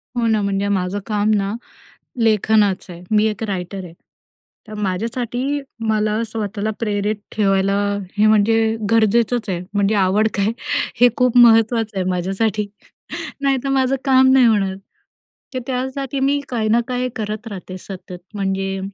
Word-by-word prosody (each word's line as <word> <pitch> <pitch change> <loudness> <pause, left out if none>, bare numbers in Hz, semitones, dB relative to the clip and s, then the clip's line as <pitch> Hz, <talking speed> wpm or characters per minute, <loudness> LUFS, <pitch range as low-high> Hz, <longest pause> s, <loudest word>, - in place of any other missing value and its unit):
हो, 240 -1 0
ना. 220 -2 +2
म्हणजे 200 0 -1
माझं 195 0 -1
काम 210 -1 0
ना, 200 0 -1 0.7
लेखनाचं 210 -3 +2
आहे. 170 +1 -12
मी 215 0 +4
एक 215 0 -3
रायटर 190 -2 -4
आहे. 170 -2 -10 0.7
तर 215 - -9
माझ्यासाठी 235 +7 -2 0.3
मला 215 0 +1
स्वतःला 215 -1 -3
प्रेरित 210 -1 -1 0.2
ठेवायला. 195 -1 +2 0.4
हे, 210 - +4
म्हणजे 215 +1 +4 0.3
गरजेचंच 230 +1 +2
आहे. 180 -2 -1
म्हणजे 205 +1 +2
आवड 200 +2 +3
काय 200 +2 +1 0.5
हे 245 - +8
खूप 250 -1 +3
महत्त्वाचं 225 -2 +5
आहे 185 - 0
माझ्यासाठी, 195 +4 -1 0.7
नाहीतर 275 -1 0
माझं 270 0 +2
काम 260 -1 +5
नाही 260 -1 +6
होणार. 200 -4 +2 0.8
तर, 255 - -2
त्यासाठी 265 +1 -3
मी 275 +2 +2
काही 225 -3 -1
ना 230 +2 +4
काही 250 0 -1
करत 215 0 -4
राहते, 185 -3 -7
सतत. 180 -1 -9 0.2
म्हणजे, 195 -1 -2
215 Hz, 145 wpm, -20 LUFS, 195-235 Hz, 0.8 s, हे